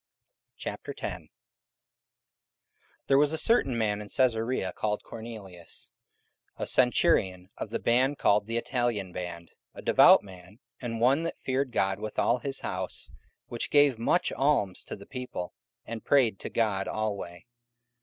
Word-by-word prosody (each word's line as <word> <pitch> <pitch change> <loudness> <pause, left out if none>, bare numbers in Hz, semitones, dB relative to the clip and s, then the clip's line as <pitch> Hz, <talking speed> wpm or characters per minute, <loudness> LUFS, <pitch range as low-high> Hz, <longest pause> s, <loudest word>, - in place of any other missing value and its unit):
44:010:001 - - -6 1.8
There 135 0 +4
was 145 0 +3
a - - 0
certain 155 - +3
man 105 -2 0
in 105 - -9
Caesarea 115 -6 +1
called 105 -1 -2
Cornelius, 105 -7 -9 0.7
a - - -3
centurion 100 - +2
of - - -5
the - - -2
band 130 +4 +2
called 105 0 +3
the 115 +1 -1
Italian 115 -6 -1
band, 85 -2 -6 0.3
44:010:002 - - -10
A - - -6
devout - - +7
man, 95 +2 -14 0.2
and 115 -2 -4
one 130 +6 +4
that 165 - -4
feared 130 0 0
God 95 -1 0
with 110 0 -6
all 125 - +2
his 135 +2 -2
house, 90 0 -4 0.3
which 120 - -3
gave 145 -5 +4
much 145 +9 +1
alms 135 -9 +1
to - - -6
the 100 - -13
people, 125 -9 -6 0.3
and 115 0 -6
prayed 125 -8 +3
to - - -5
God 105 -4 0
alway. 100 -4 -4
115 Hz, 145 wpm, -28 LUFS, 95-130 Hz, 1.8 s, devout